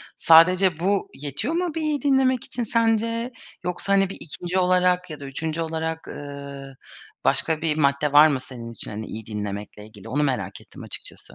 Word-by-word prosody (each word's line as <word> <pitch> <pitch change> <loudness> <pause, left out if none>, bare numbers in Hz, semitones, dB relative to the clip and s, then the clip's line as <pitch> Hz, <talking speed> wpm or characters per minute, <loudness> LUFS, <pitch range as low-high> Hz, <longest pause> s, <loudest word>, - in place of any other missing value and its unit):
Sadece 170 +1 +5
bu 195 +2 +1
yetiyor 145 - -3
mu 345 -2 -1
bir 325 - -1
iyi 300 -2 0
dinlemek 265 -3 +3
için 240 - -3
sence? 230 +1 +1 0.3
Yoksa, 180 +3 -1
hani, 195 -1 +3
bir - - -7
2'nci 175 +3 -3
olarak 180 0 +2
ya 155 - -7
da 140 - -8
3'üncü 160 +4 -3
olarak, 160 0 -3
ııı, 140 -1 -8 0.5
başka 160 -1 +1
bir 155 -2 0
madde 140 0 +2
var 150 +2 +9
mı 140 -4 0
senin 120 -3 -7
için, 115 - -5
hani, 110 +1 -5
iyi 110 0 -7
dinlemekle 105 0 -6
ilgili? 110 +1 -13
Onu 145 +4 +1
merak 135 -3 -2
ettim - - -13
açıkçası. - - -8
160 Hz, 180 wpm, -24 LUFS, 140-195 Hz, 0.5 s, var